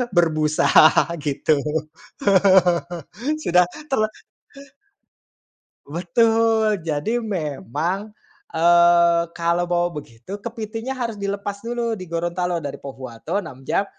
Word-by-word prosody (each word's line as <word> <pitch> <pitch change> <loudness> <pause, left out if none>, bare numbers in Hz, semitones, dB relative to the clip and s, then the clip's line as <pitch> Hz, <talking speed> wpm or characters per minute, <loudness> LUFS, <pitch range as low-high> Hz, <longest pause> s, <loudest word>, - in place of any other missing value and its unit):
berbusa 155 -3 +2 0.6
gitu. 145 0 +1 1.8
Sudah 180 - +4
ter 300 0 -3 1.9
betul. 220 +5 +2
Jadi 155 +9 -1
memang, 180 - -3 0.4
eee, 170 0 +5
kalau 170 +1 +1
bawa 175 0 +1
begitu, 115 - -10
kepitingnya 225 +2 -5
harus 230 -3 -3
dilepas 200 0 -4
dulu 235 -1 -2
di 185 - -8
Gorontalo, 175 +1 -1
dari 140 -1 -5
Pohuwato 135 - -5
6 135 0 -11
jam, 195 - +1
175 Hz, 90 wpm, -22 LUFS, 155-215 Hz, 1.9 s, eee